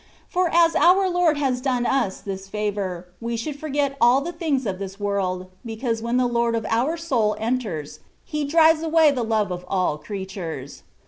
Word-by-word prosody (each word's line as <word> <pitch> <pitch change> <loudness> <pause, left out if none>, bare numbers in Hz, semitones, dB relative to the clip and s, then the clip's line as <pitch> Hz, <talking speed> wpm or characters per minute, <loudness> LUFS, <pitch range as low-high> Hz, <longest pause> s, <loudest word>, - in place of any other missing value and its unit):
For 360 -1 +1
as 335 -1 +4
our 370 +2 +5
Lord 350 -4 +2
has 260 -3 0
done 250 -2 0
us 255 -9 0
this 195 -1 -6
favour, 195 -4 -3
we 230 0 -2
should 285 +5 -5
forget 285 -2 -1
all 245 +3 +6
the 325 +5 -4
things 310 -6 -1
of 190 -3 -3
this 195 0 -7
world, 185 -2 -2
because 225 0 -3
when 235 +2 0
the 255 - +3
Lord 235 -1 +1
of 225 -1 -2
our 260 +9 +1
soul 245 -10 +1
enters. 210 - -3 0.3
He 300 -1 -3
drives 320 +2 +4
away 320 -2 +4
the 260 -3 -2
love 220 -4 0
of 180 0 -4
all 180 -6 0
creatures. 190 -9 -6
235 Hz, 185 wpm, -23 LUFS, 200-295 Hz, 0.3 s, all